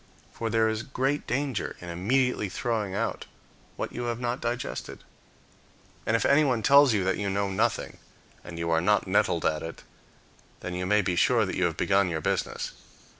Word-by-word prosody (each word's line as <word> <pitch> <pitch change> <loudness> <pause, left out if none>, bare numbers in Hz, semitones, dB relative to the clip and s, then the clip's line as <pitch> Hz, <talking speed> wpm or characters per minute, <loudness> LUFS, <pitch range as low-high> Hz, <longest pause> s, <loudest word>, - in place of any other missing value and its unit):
For 115 - -3
there 110 0 +3
is 110 0 -1
great 135 +3 -2
danger 135 -3 -2
in 90 - -9
immediately 110 +5 0
throwing 105 -2 -2
out 115 +2 -2 0.5
what - - -4
you 120 - -4
have 120 -1 -2
not 120 +1 -2
digested. 120 +1 -4 1.0
And, 110 - +3
if 115 - +1
anyone 140 -6 +3
tells 140 +2 +7
you 105 -4 +1
that 95 +1 0
you 100 -1 -1
know 100 0 -1
nothing, 110 +4 -1 0.5
and 85 -1 -9
you 85 0 -2
are 80 0 +3
not - - +2
nettled - - +1
at 80 -1 +1
it, 80 0 -8 0.8
then 90 - -5
you 90 0 -3
may 105 +1 +3
be 90 - 0
sure - - +3
that - - -4
you - - +1
have - - -1
begun 95 -1 +2
your 80 -2 -2
business. - - -2
110 Hz, 185 wpm, -27 LUFS, 95-120 Hz, 1.0 s, tells